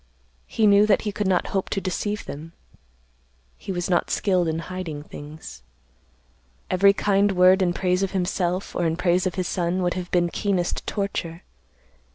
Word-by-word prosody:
He 220 - +1
knew 205 0 +6
that 205 - +3
he 210 - -2
could 205 -1 -2
not 185 -2 +1
hope 195 -1 -1
to 195 - -1
deceive 205 +3 -3
them. 160 +4 -8 1.1
He - - -6
was 175 -1 -2
not 175 -2 +1
skilled 185 -4 +1
in 160 0 -1
hiding 165 -3 -6
things. 150 +1 -10 1.1
Every 200 +2 +5
kind 200 0 +2
word 185 +1 +5
in 180 -2 +2
praise 180 +1 0
of 195 - 0
himself, 180 0 -2
or 170 - +1
in 160 0 -1
praise 180 +1 +2
of 180 - -4
his 185 -2 -2
son, 180 +1 -1
would 175 - +1
have 180 -1 -5
been 175 -1 +2
keenest 185 -2 -1
torture. 185 -4 -3
185 Hz, 175 wpm, -24 LUFS, 175-195 Hz, 1.1 s, knew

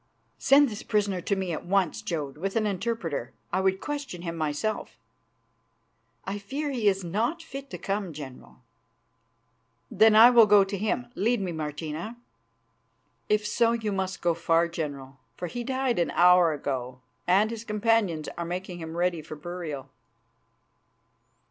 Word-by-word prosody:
"Send 280 +1 +6
this 210 -2 -6
prisoner 200 -3 0
to 200 - 0
me 190 -3 -2
at - - -4
once, 185 -3 +1
Jodd, 150 -5 -4
with 195 +6 -4
an 220 -1 +2
interpreter. 185 - -3 0.2
I 190 - +2
would 190 0 +1
question 285 -12 -5
him 165 -1 -4
myself." 160 +7 -2 1.3
"I 200 +1 -3
fear 280 +9 -4
he 235 -6 0
is 195 -1 +2
not 230 - -1
fit 275 -3 -8
to - - -6
come, 195 -2 -3
General." 140 -4 -11 1.3
"Then 220 +2 +5
I 230 +3 +9
will 230 -3 +7
go 205 -1 +7
to 195 +1 -4
him. 220 +5 -2
Lead 235 +1 +1
me, 190 -3 -2
Martina." 160 +7 -5 1.1
"If 210 0 +2
so, 230 +2 +2
you 220 -3 -2
must 190 -1 -3
go 170 -1 +3
far, 165 0 +2
General, 140 -5 -6 0.2
for 180 - -4
he 240 +8 -4
died 260 -3 0
an 170 - +1
hour 180 -1 +6
ago, 130 -4 -4 0.3
and 200 +5 +4
his 230 -1 -6
companions 210 -7 +1
are - - -1
making 180 +1 -5
him 160 0 -6
ready 175 -2 0
for 155 - -9
burial." 150 -4 -6
190 Hz, 155 wpm, -27 LUFS, 165-220 Hz, 1.3 s, I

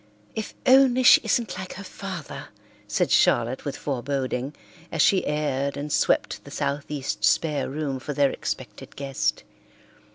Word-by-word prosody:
"If 220 - -5
only 260 -1 +5
she - - +8
isn't 225 -7 0
like 185 0 -6
her 200 - -8
father," 190 -5 -7 0.4
said - - 0
Charlotte 120 +2 +3
with 140 - -3
foreboding, 135 0 -3 0.4
as 165 - -4
she 190 +5 +4
aired 140 -2 -1
and 145 +1 -4
swept - - +1
the - - -12
southeast 140 0 -3
spare 150 -3 +2
room 140 -1 -3
for 145 +4 -5
their 140 -1 +3
expected - - -6
guest. 135 -1 -2
145 Hz, 140 wpm, -25 LUFS, 135-185 Hz, 0.4 s, she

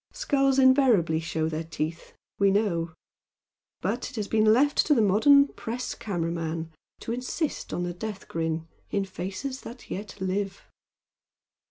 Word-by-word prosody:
Skulls 275 -2 +2
invariably 260 - +5
show 160 -1 -1
their 160 0 -3
teeth, 160 0 -5 0.3
we 200 0 +5
know 185 -5 +1 0.9
but 220 +8 -2
it 255 - -12
has 210 -3 -2
been 220 -1 +2
left 275 +6 +4
to 300 - +5
the - - +3
modern 280 +8 +6
press 245 +2 -4
camera 175 -8 -3
man 165 -1 -3 0.3
to - - -4
insist 255 +6 -3
on 175 - -2
the 175 0 -3
death 205 +2 -6
grin 165 0 -2 0.2
in 200 -1 0
faces 200 +9 -5
that 240 +2 -11
yet 205 +2 -6
live. 195 +1 -2
200 Hz, 150 wpm, -27 LUFS, 170-250 Hz, 0.9 s, modern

